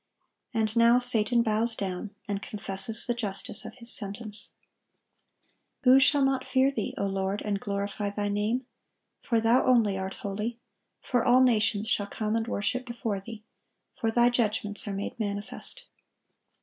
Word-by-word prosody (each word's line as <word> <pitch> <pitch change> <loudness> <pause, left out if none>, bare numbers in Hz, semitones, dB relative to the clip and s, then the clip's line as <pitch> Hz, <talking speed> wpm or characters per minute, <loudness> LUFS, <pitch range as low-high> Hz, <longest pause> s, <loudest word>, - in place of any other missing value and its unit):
And 220 -2 -1
now 235 +1 +5
Satan 240 -1 +5
bows 225 +1 +1
down, 190 +1 -4 0.2
and 200 -1 -3
confesses 200 +2 -1
the 240 - 0
justice 210 -2 -1
of - - -9
his 235 -1 +1
sentence. 210 +1 -1 1.3
"Who 260 +1 +7
shall 280 +1 +4
not 270 -1 -1
fear 265 +1 +2
Thee, 225 -7 -4
O 200 - -1
Lord, 195 +1 -2
and 205 -1 -1
glorify 200 0 -3
Thy 205 0 -3
name? 210 +5 -1 0.6
for 230 -2 0
Thou 230 +3 +3
only 225 -6 +2
art 190 0 -5
holy: 210 +4 -4 0.4
for 245 -3 0
all 250 +1 +5
nations 220 -3 +2
shall 205 -2 0
come 215 +1 -3
and 225 0 -1
worship 245 +4 -1
before 235 -4 -4
Thee; 220 +2 -10 0.5
for 225 - -1
Thy 240 +2 +3
judgments 210 -3 0
are 200 - -3
made 200 +3 -5
manifest." 205 -1 -2
220 Hz, 155 wpm, -27 LUFS, 205-240 Hz, 1.3 s, Who